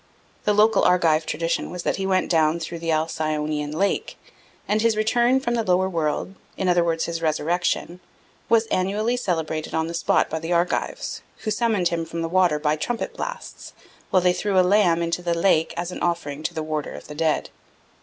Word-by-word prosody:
The 210 - +3
local 215 +2 +4
Argive 165 -3 +3
tradition 165 +2 -1
was 180 -1 -6
that - - 0
he 190 0 -2
went 185 -1 +1
down 160 0 +3
through 170 +1 -5
the 165 0 -4
Alcyonian 155 -1 -1
lake; 195 +6 -1 0.5
and 215 +1 +1
his 225 -1 +2
return 240 +4 +3
from 240 -3 -2
the 230 -1 0
lower 185 -1 +2
world, 165 +1 -2 0.2
in 190 - -1
other 175 -1 +4
words 165 -1 0
his 165 -1 -4
resurrection, 170 +2 -1 0.5
was 230 0 +4
annually 210 +6 0
celebrated 160 -8 -2
on 160 0 +1
the 165 - -5
spot 170 - +2
by 160 - -3
the 165 +2 -5
Argives, 175 - -1 0.2
who 215 - -2
summoned 210 -5 +1
him 170 -1 -2
from 165 0 -4
the - - -1
water 180 -3 +3
by 150 0 +1
trumpet 230 +10 -3
blasts, - - -7 0.4
while 185 - +3
they 180 -1 +4
threw 190 +1 +1
a 180 - +5
lamb 180 -4 +3
into 170 +1 -1
the 170 -1 0
lake 165 -2 +3
as 175 +1 -3
an - - -7
offering 160 -4 -2
to 165 - -3
the 160 - -2
warder 155 -1 -3
of - - -10
the 150 - -8
dead. 155 0 0
170 Hz, 200 wpm, -23 LUFS, 160-195 Hz, 0.5 s, a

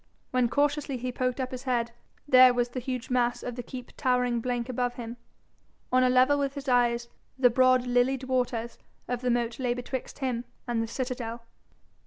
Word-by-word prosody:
When 250 -2 +2
cautiously 285 0 0
he 250 +1 -3
poked 255 +1 -1
up 255 -1 -2
his 255 -1 -5
head, 240 -2 0 0.4
there 255 -2 +7
was 245 0 +1
the 255 - -4
huge 255 0 -5
mass 245 -1 +1
of 245 - -4
the 245 - -4
keep 250 0 -9
towering 250 -2 +1
blank 245 0 -2
above 245 -1 -1
him! 235 0 -7 0.7
On 255 0 +4
a 255 - +4
level 255 +3 +4
with 275 0 -1
his 280 0 -7
eyes, 240 -1 +2 0.3
the 250 -2 +5
broad, 255 0 +4
lilied 250 +2 +1
waters 245 -3 -1 0.3
of 245 -1 -2
the 250 - 0
moat 240 0 0
lay 245 -2 0
betwixt 250 +1 -5
him 250 -4 -2 0.2
and 235 -1 0
the 225 - -2
citadel. 240 -1 -4
250 Hz, 190 wpm, -28 LUFS, 240-255 Hz, 0.7 s, there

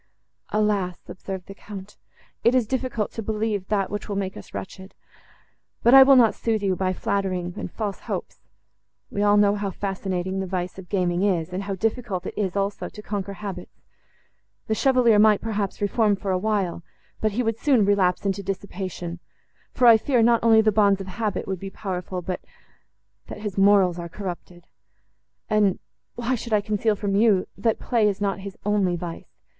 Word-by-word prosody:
"Alas!" 205 -4 0
observed 190 0 -7
the 195 - -9
Count, 200 0 -10 0.5
"it 240 - +4
is 250 -3 +3
difficult 250 -3 -2
to 225 - -5
believe 215 -3 -2
that, 200 -2 0
which 205 +1 -5
will 200 - -2
make 195 -1 -3
us - - -11
wretched. 190 0 -8 0.9
But 235 - +5
I 270 - +11
will 270 +1 +8
not 235 -4 +6
sooth 220 -3 -1
you 190 -2 +1
by 185 0 0
flattering 185 -2 -2
and - - -6
false 205 -3 -4
hopes. - - -5 0.7
We 200 - -2
all 205 0 +4
know 205 -1 +5
how 205 -1 -2
fascinating 190 -1 -3
the 190 - -3
vice 180 0 -3
of 180 - -11
gaming 180 -3 0
is, 180 -5 +1
and 185 - -2
how 195 -1 -3
difficult 215 -2 -2
it - - -5
is, 195 -3 -2
also, 200 0 -2
to 210 - -11
conquer 200 -2 -4
habits; 195 -3 -8 0.9
the 220 - -1
Chevalier 245 -3 +4
might, 210 -1 +5
perhaps, 210 -3 -3
reform 205 0 +2
for 195 0 -3
a 185 - +1
while, 195 -4 -1 0.4
but 215 -1 +1
he 245 +4 0
would 225 -1 -1
soon 260 -8 +3
relapse 195 -2 +2
into 195 0 0
dissipation—for 185 +3 -5
I 230 -2 +9
fear, 240 +1 +2
not 235 0 +4
only 225 -1 +6
the 215 0 +3
bonds 200 -2 +3
of 195 - -5
habit 205 +2 -3
would 190 -2 -3
be 195 - -6
powerful, 185 -2 -5
but 180 +1 -4 0.9
that 210 - -8
his 210 -3 -4
morals 195 -3 +4
are 170 0 -6
corrupted. 175 -2 -7 0.8
And—why 215 +4 -1
should 235 -2 -3
I 210 - +4
conceal 215 +1 0
from 200 -1 -2
you, 205 -3 +4
that 220 +2 0
play 230 -4 +1
is 200 -2 -1
not 200 -1 -1
his 195 0 -8
only 200 -4 +2
vice? 170 -1 -7
200 Hz, 180 wpm, -24 LUFS, 190-215 Hz, 0.9 s, I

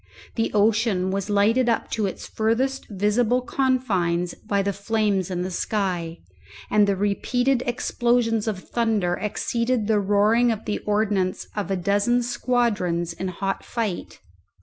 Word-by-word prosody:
The 225 -1 0
ocean 210 -3 +2
was 195 +1 -2
lighted 220 +5 +3
up 230 - -1
to 215 -3 0
its 190 - -6
furthest 250 +5 -1
visible 215 +5 +1
confines 200 -11 0
by 200 -1 -2
the 200 0 -1
flames 200 -2 0
in 180 -1 -2
the 185 - -4
sky, 180 -4 -2 0.5
and 210 -1 +4
the 200 - +2
repeated 245 +6 +1
explosions 240 -2 +1
of 195 -4 -4
thunder 220 -7 +1
exceeded 230 +4 -1
the 215 -1 +2
roaring 210 +4 +3
of 220 -1 -4
the 210 - -2
ordnance 205 -3 0
of 205 -2 -3
a 195 - 0
dozen 205 +7 +1
squadrons 210 -9 0
in 190 - -4
hot 195 +2 -3
fight. 220 -7 -4
210 Hz, 145 wpm, -24 LUFS, 195-235 Hz, 0.5 s, and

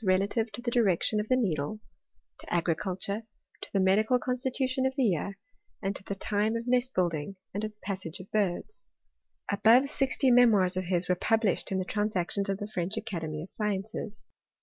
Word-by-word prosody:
291 185 -2 +4 0.2
relative 225 0 +1
to 240 - -7
the 240 - -1
direction 215 -2 +2
of 210 - -2
the 255 - +5
needle, 190 - -1 0.6
to - - -11
agriculture, 185 +4 -1 0.4
to - - -8
the 195 - +1
medical 210 +6 +4
constitution 255 +2 -1
of 265 - -4
the 275 - +1
year, 195 -2 0 0.4
and 195 0 -2
to - - -8
the 200 - -3
time 210 +2 0
of 230 0 -3
nest*building, 195 - 0 0.2
and 205 +2 -3
of 215 - -1
the 210 - -24
passage 190 -3 -4
of 185 - -9
birds. 205 - -1 0.6
Above 230 +6 +5
sixty 270 -1 +2
memoirs 215 -7 +5
of 185 0 -2
his 175 0 0
were 180 - +3
published] 215 +2 +1
in 190 - +1
the 185 - -1
Transactions 200 -1 -1
of 195 - 0
the 205 - -5
French 195 0 -2
Academy 165 -8 -4
of 180 - -10
Sciences. 210 0 -3
205 Hz, 185 wpm, -29 LUFS, 185-230 Hz, 0.6 s, the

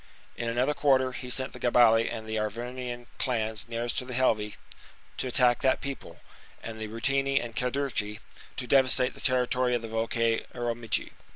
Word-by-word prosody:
In 120 - -3
another 125 +5 +1
quarter, 130 -3 +3
he 125 0 -7
sent 130 +1 0
the - - -9
Gabali 115 -2 +5
and 110 - -5
the 110 0 -1
Arvernian 120 +3 -4
clans 110 -4 -1
nearest 115 +1 -1
to 125 - -5
the 125 -1 -4
Helvii 110 -5 +1 0.6
to - - -1
attack 125 -1 +3
that 130 -1 +3
people, 135 -12 -7 0.4
and 110 -1 -7
the 110 - -4
Ruteni 135 +5 +1
and 120 -1 -7
Cadurci 125 -4 -1 0.4
to 125 - -2
devastate 130 -1 +4
the - - -9
territory 125 -1 +2
of 120 - -2
the - - -4
Volcae 115 0 0
Arecomici. 120 -2 -1
120 Hz, 170 wpm, -28 LUFS, 115-130 Hz, 0.6 s, Gabali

